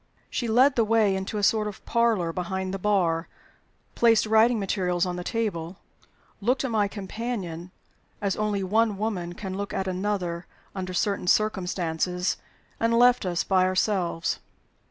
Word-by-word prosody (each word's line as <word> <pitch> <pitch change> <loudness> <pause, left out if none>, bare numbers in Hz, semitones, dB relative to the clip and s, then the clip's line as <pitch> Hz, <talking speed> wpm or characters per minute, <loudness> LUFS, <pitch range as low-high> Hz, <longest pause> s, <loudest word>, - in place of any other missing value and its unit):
She 240 - -2
led 255 +5 +4
the 230 - +3
way 215 -3 +3
into 190 +3 -3
a 205 - -2
sort 215 0 +3
of 205 - -8
parlor 225 -8 +1
behind 190 +1 -3
the 195 - -3
"bar," 180 -5 +1 0.7
placed 225 -2 +4
writing 220 +2 +4
materials 185 -3 0
on 180 -1 -3
the 180 - -5
table, 190 -6 -3 0.6
looked 245 +6 +1
at 255 - -2
my 210 -2 +2
companion 195 -4 -5 0.5
as 200 -2 -1
only 210 -2 -1
one 215 +2 +2
woman 190 -5 -2
can 190 0 -6
look 200 +1 -4
at 190 - -1
another 185 -2 -2 0.3
under 185 -1 -4
certain 200 0 0
circumstances, 180 -3 0 0.4
and 230 0 +2
left 245 -4 +5
us 175 -1 0
by 185 -1 +3
ourselves. 185 -2 0
195 Hz, 155 wpm, -26 LUFS, 180-220 Hz, 0.7 s, left